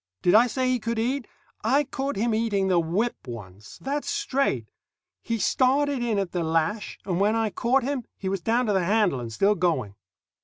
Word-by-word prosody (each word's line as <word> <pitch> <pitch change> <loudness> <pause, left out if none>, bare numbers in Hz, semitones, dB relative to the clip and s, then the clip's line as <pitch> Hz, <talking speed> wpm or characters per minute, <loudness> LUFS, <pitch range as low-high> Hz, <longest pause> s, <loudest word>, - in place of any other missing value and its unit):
Did 180 - +4
I 230 +3 +7
say 255 +2 -1
he 255 -1 +1
could 230 +1 -3
eat? 245 +2 -1 0.4
I 270 +7 +3
caught 275 0 -3
him 230 +3 0
eating 210 -4 +1
the 180 -2 +4
whip 175 - -1
once. 105 -4 -9
That's 285 +2 -3
straight. 275 - 0 0.6
He 230 - -2
started 270 +4 +2
in 235 -3 0
at 195 -3 -1
the 175 - -1
lash, 165 +6 -1
and 180 -2 -1
when 210 +3 +3
I 225 -2 0
caught 250 +7 +1
him 265 -2 -2
he 190 - -5
was 190 -1 -1
down 235 +7 +1
to 210 - +1
the 190 -2 +2
handle, 200 - +2
and 115 -2 -6
still 195 - +3
going. 165 - 0
220 Hz, 200 wpm, -25 LUFS, 180-255 Hz, 0.6 s, I